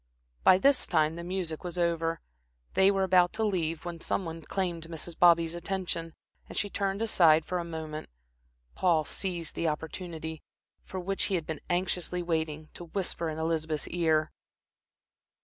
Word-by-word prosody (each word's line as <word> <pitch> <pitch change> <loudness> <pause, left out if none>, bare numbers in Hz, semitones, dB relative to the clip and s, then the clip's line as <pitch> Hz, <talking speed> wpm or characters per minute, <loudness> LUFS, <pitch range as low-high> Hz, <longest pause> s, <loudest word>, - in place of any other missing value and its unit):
By 185 - +8
this 275 +6 +4
time 155 +1 +2
the 170 - -6
music 175 -3 -3
was 180 -1 -5
over. 165 -1 0 0.5
They 190 0 +6
were 195 -1 +2
about 180 -1 +4
to 220 - 0
leave, 165 -6 -1
when 170 -1 -5
some 190 - -1
one 165 0 -6
claimed 175 -1 -2
Mrs. 165 0 -5
Bobby's 170 -1 +5
attention, 175 -2 -3 0.3
and - - -7
she 205 - 0
turned 200 +2 -1
aside 165 -8 +5
for 180 - -1
a - - -2
moment. 160 -2 -6 0.6
Paul 165 -4 +2
seized 175 -3 -3
the 170 - -1
opportunity, 160 0 -4 0.4
for 190 - -6
which 195 +2 +1
he 195 - 0
had 165 -3 -1
been 160 -2 -5
anxiously 180 0 0
waiting, 160 -2 -2
to 175 - -8
whisper 170 -1 -2
in 155 - -4
Elizabeth's 160 -1 -1
ear. 160 -3 +2
170 Hz, 165 wpm, -29 LUFS, 160-185 Hz, 0.6 s, By